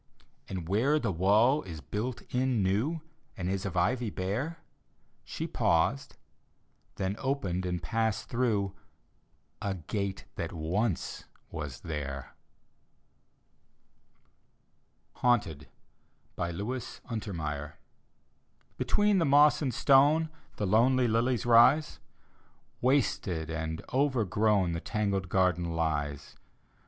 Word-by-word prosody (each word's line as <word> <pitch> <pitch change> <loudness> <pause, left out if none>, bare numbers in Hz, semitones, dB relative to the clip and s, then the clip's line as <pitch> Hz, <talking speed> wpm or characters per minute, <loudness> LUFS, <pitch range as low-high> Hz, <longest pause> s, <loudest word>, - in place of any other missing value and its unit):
And 90 -4 -5
where 120 - +2
the 145 - -1
wall 105 - +4
is 85 -4 -8
built 115 +6 -4
in 125 -4 +1
new 115 - 0 0.4
And 90 - -3
is 95 +1 -1
of 95 - -5
ivy 115 +6 +1
bare 105 - -3 0.7
She - - -5
paused 115 +12 0 0.4
— - - -41
then 95 0 -2
opened 95 -10 -1
and 90 -1 -3
passed 110 -2 -1
through 110 -6 0 0.9
A 100 -1 -2
gate 95 - -4
that - - -3
once 90 +5 -2 0.3
was 75 -5 -6
there. 70 -4 -5 2.8
HAUNTED: 105 - +1 0.7
look 100 +9 -3 0.3
untermeyer 80 -10 -4 1.1
Between 205 -2 +3
the 165 - +2
moss 145 +1 +5
and 135 -4 0
stone 145 +6 +4 0.3
The 105 - -2
lonely 120 +5 +4
lilies 120 +2 +1
rise; 120 +6 +5 0.8
Wasted 100 - +1
and 80 0 -4
overgrown 110 -8 +2
The 85 0 -3
tangled 100 -4 -1
garden 90 -3 +1
lies. 75 -3 -2
105 Hz, 105 wpm, -30 LUFS, 85-125 Hz, 2.8 s, moss